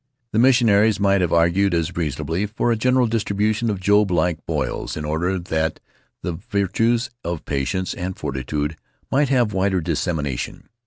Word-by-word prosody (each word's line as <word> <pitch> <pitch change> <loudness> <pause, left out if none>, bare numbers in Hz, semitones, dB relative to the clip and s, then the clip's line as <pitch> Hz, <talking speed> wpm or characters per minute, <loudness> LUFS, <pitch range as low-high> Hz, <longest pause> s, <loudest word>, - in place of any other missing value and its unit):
The 110 - +2
missionaries 110 -5 +4
might 100 -1 +3
have 90 - 0
argued 85 +3 +3
as 85 +1 -1
reasonably 80 +4 -2
for 110 +3 0
a - - +3
general 125 +3 +3
distribution 110 0 0
of 100 -3 -2
Job 105 +2 +3
like 90 -2 0
boils, 75 -4 -2
in 75 - -4
order 85 +5 0
that 80 -3 -2 0.4
the 90 - -2
virtues 110 +5 0
of 85 -1 -4
patience 70 +7 -1
and 90 +1 -5
fortitude 75 +3 -3 0.3
might 140 0 +2
have 120 -5 +2
wider 95 0 +1
dissemination. 80 -5 -3
95 Hz, 155 wpm, -22 LUFS, 80-105 Hz, 0.4 s, missionaries